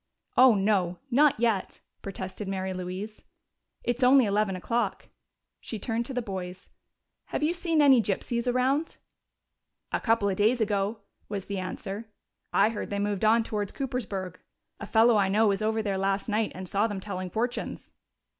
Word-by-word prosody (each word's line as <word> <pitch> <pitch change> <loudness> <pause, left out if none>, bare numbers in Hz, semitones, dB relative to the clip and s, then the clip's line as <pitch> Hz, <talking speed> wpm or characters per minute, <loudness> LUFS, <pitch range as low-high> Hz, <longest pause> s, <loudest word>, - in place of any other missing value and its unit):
"Oh, 255 -3 +7
no 195 -3 +1
not 285 0 +4
yet!" 225 -5 0 0.2
protested 190 +1 -6
Mary 190 -1 -2
Louise. 185 +4 -6 0.6
"It's 240 +1 -1
only 255 0 +6
eleven 205 -1 +1
o'clock." 225 +2 -2 0.5
She 225 - -6
turned 230 +3 -2
to 270 - -6
the 250 - -1
boys. 185 -3 -6 0.6
"Have - - -3
you 315 +3 +2
seen 335 -3 +1
any 265 -4 +7
gypsies 235 +4 -1
around?" 265 +6 0 0.9
"A - - 0
couple 225 -3 +2
of 190 -2 -1
days 220 +4 +3
ago," 210 0 0 0.3
was 200 -2 -4
the 200 -1 -3
answer. 195 +4 -5 0.4
"I 200 +2 +4
heard 225 - -5
they 200 - -2
moved 205 -1 -1
on 225 +2 +5
towards 210 -3 -3
Coopersburg. 205 - -4 0.4
A 215 - -7
fellow 225 +1 +5
I 195 -2 +2
know 215 +2 +4
was 195 0 0
over 220 +1 0
there 195 -2 -1
last 195 0 0
night 215 0 0
and 185 0 -7
saw 200 +5 +1
them 205 -3 -4
telling 185 -2 -5
fortunes." 240 +5 -3
210 Hz, 165 wpm, -27 LUFS, 195-235 Hz, 0.9 s, Oh